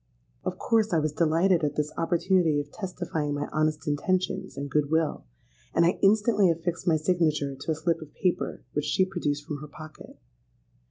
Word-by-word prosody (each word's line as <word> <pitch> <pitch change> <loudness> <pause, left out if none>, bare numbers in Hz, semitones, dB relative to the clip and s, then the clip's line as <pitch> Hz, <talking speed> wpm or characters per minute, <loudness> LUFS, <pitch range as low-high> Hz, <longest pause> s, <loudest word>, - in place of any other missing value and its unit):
'—Of - - -3
course 220 -3 +1
I - - +4
was 155 0 0
delighted 165 +3 +2
at 150 - 0
this 150 0 -1
opportunity 170 -2 +2
of 145 0 -6
testifying 175 -6 -3
my 145 0 -2
honest 155 0 0
intentions 180 +2 -1
and 140 +1 -3
good 145 0 0
will; 160 - 0 0.5
and 170 - +5
I 175 - +1
instantly 210 -1 +4
affixed 170 +2 -2
my 160 -2 +4
signature 155 -3 +1
to 140 +4 -4
a - - 0
slip 165 +1 -1
of 155 -2 -10
paper 180 -2 -1
which 150 0 -1
she 150 +6 +2
produced 150 -6 -2
from 150 - -4
her 150 +1 -9
pocket. 155 +1 -12
160 Hz, 180 wpm, -27 LUFS, 150-180 Hz, 0.5 s, and